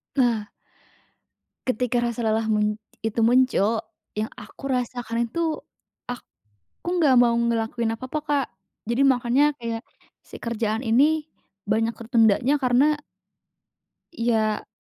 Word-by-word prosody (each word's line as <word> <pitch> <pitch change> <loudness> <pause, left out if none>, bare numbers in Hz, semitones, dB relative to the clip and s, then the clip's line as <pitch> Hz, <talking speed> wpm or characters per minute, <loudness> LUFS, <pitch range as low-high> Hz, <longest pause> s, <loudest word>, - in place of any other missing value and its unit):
Nah 235 -6 +1 1.2
ketika 250 0 +1
rasa 235 -1 -2
lelah 220 0 +1
mun 210 -1 +2 0.3
itu 225 +1 0
muncul 230 -2 +3 0.3
yang 215 +1 -1
aku 210 +5 -11
rasakan 245 -2 -1
itu 320 +3 -1 0.5
aku 245 - -9 0.4
nggak 325 -7 +4
mau 235 -1 +4
ngelakuin 230 0 0
apa-apa, 255 +6 -4
Kak, 285 -3 0 0.4
jadi 240 +4 +2
makannya 260 +1 +4
kayak 230 -1 -3 0.4
si - - -11
kerjaan 225 -1 -1
ini 295 +6 +3 0.4
banyak 225 +2 +2
ketundanya 230 +3 +3
karena 270 +3 +3 1.2
iya, 225 -6 0
235 Hz, 110 wpm, -24 LUFS, 225-260 Hz, 1.2 s, nggak